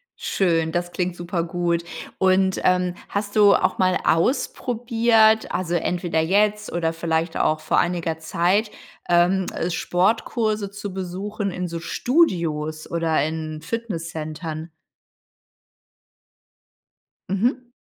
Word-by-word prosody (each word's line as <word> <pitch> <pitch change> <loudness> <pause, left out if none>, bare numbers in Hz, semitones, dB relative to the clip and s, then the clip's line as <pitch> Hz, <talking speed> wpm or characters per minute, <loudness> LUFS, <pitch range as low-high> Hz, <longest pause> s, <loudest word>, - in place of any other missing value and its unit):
Schön, 165 -4 0
das 175 +1 -2
klingt 180 -1 -2
supergut. 175 -1 -1 0.4
Und, 190 0 +3
ähm, 180 -1 +2 0.2
hast 205 0 -3
du 205 -2 +7
auch - - +1
mal 185 -1 +3
ausprobiert, 225 - +2
also 175 -1 -1
entweder 175 -1 -1
jetzt 210 +5 +1
oder 165 -1 -1
vielleicht 165 0 -1
auch 155 - +1
vor 155 - +1
einiger 170 -2 -1
Zeit, 180 +6 +1 0.4
ähm, 175 +2 +3 0.2
Sportkurse 210 +4 0
zu 205 -1 -6
besuchen 195 +3 -4
in 180 0 -3
so 170 -1 -5
Studios 165 - 0
oder 165 -3 +1
in 155 0 -4
Fitnesscentern? 165 -5 -5 2.6
Mhm. 240 +6 -1
180 Hz, 105 wpm, -23 LUFS, 165-205 Hz, 2.6 s, du